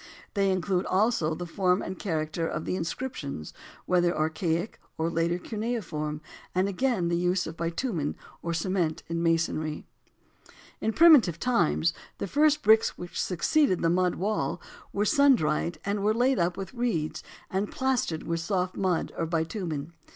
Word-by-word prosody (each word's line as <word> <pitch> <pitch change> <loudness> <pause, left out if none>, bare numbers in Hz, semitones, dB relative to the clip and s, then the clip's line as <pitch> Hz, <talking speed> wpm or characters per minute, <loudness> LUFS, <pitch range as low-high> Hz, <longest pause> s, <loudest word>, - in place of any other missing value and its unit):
They 195 -2 +2
include 185 0 0
also 185 -6 +2
the 175 - -5
form 180 +2 +1
and 185 - -6
character 160 -2 -2
of 155 - -4
the - - -1
inscriptions, 165 - -4 0.3
whether 175 -1 +2
archaic 165 +4 -1 0.2
or 165 +1 0
later 165 +1 +1
cuneiform, 180 -9 -3 0.3
and 185 +1 +2
again 200 -2 0
the 170 - +1
use 180 +1 +1
of 160 - -6
bitumen 170 - -2 0.3
or 170 - -3
cement 170 -1 -1
in 165 0 -1
masonry. 165 -2 0 0.9
In 220 - 0
primitive 260 - +6
times 170 -9 +2 0.2
the - - -3
first 295 - +3
bricks 220 +1 +4
which 175 0 -4
succeeded 185 - +2
the 165 - +3
mud 180 0 +2
wall 210 +3 -1 0.3
were 205 +1 0
sun 280 +1 +5
dried 155 -2 -1
and 200 0 -1
were 215 +1 +2
laid 250 +1 +2
up 175 +1 +1
with 195 +1 -6
reeds 230 -11 -1 0.3
and 195 +2 -1
plastered 255 -11 0
with 165 0 -2
soft 180 +1 -1
mud 185 -3 0
or 165 - -2
bitumen. 165 -2 -3
180 Hz, 155 wpm, -28 LUFS, 165-210 Hz, 0.9 s, primitive